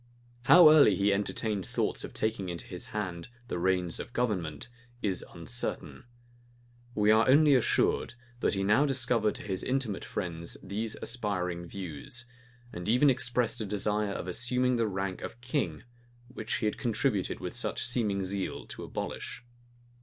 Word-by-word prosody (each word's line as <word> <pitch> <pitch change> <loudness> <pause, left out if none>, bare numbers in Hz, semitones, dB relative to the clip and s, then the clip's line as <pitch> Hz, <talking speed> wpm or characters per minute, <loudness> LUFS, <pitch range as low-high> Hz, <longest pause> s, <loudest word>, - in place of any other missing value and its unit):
How 170 -3 +9
early 145 -10 +7
he 100 +2 +2
entertained 105 0 -1
thoughts - - -2
of - - -6
taking 110 -4 -2
into 85 -1 -5
his 90 - -3
hand 90 -5 -4 0.2
the 90 - -2
reins 90 -2 0
of 120 - -7
government, 95 - -2 0.4
is 95 -3 0
uncertain. 120 +8 -4 0.9
We 105 0 +4
are 110 +3 +4
only 145 +2 +6
assured, 125 -1 +2 0.2
that - - +1
he 95 - -1
now 105 +9 +4
discovered 120 -5 +1
to - - -8
his 95 -3 -3
intimate 130 -6 -1
friends 85 -1 -4
these 110 +2 -2
aspiring 90 -7 -1
views; 95 - -6 0.5
and 90 +3 -5
even 125 +5 +5
expressed 125 -2 +1
a - - -2
desire 105 0 0
of 95 - -5
assuming 125 +5 +1
the 115 -1 +1
rank 95 -2 -3
of 120 - -7
king, 125 +4 -2 0.5
which 115 -3 -4
he - - -2
had 105 - -1
contributed 115 -3 0
with - - -5
such - - 0
seeming 105 -6 +1
zeal 95 0 -3
to - - -7
abolish. 120 - -6
105 Hz, 155 wpm, -29 LUFS, 95-120 Hz, 0.9 s, How